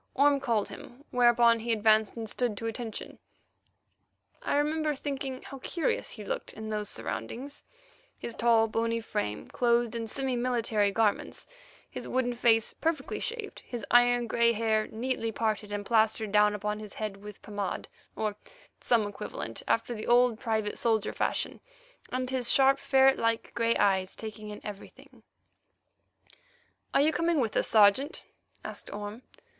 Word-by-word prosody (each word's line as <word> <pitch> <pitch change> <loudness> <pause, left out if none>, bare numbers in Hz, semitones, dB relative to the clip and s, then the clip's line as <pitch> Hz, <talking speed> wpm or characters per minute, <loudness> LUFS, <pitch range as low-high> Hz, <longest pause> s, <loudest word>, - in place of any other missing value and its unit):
Orme 280 +1 +4
called 230 -6 0
him, 250 +4 -11
whereupon 240 -1 +5
he 235 +1 -2
advanced 220 0 +3
and 225 -1 -4
stood 230 -1 -1
to 225 - -5
attention. 225 0 -5 1.2
I - - 0
remember 305 +1 +1
thinking 270 -2 -4
how 275 - -9
curious 325 +4 -1
he 210 -3 -9
looked - - -4
in 220 0 -7
those 210 -1 -2
surroundings—his 290 - -7
tall, 230 -1 +4
bony 230 +1 0
frame 210 - -3
clothed 240 -1 +2
in 230 -1 -3
semi 265 +3 -2
military 230 -4 +1
garments, 210 0 0 0.4
his - - -7
wooden 250 -1 0
face 230 -2 +3
perfectly 320 -4 -2
shaved, 460 -3 -4
his 240 -4 -6
iron 245 0 +5
grey 235 0 +3
hair 220 -1 +1
neatly 230 0 -2
parted 215 -2 -1
and 205 0 -3
plastered 220 -1 +2
down 210 0 +4
upon 210 +1 -3
his 210 -1 -9
head 210 -2 -4
with 210 0 -11
pomade 205 -2 -4 0.3
or 215 -2 -2 0.4
some 230 -3 +2
equivalent 195 - -6
after 230 +1 +1
the 215 -2 -6
old 240 -1 +4
private 220 -2 -1
soldier 220 -2 +1
fashion, - - -1 0.5
and 255 0 -2
his 255 -2 +1
sharp 270 0 +5
ferret 270 0 +4
like 230 0 0
grey 230 0 +2
eyes 190 -2 +2
taking 215 -1 -7
in 210 - -7
everything. 205 -1 -10 1.7
"Are - - +4
you 310 +2 +3
coming 335 -1 +1
with 230 -5 -1
us, - - +2
Sergeant?" 220 - +4 0.4
asked - - -6
Orme. 205 +3 -6
230 Hz, 150 wpm, -29 LUFS, 215-255 Hz, 1.7 s, whereupon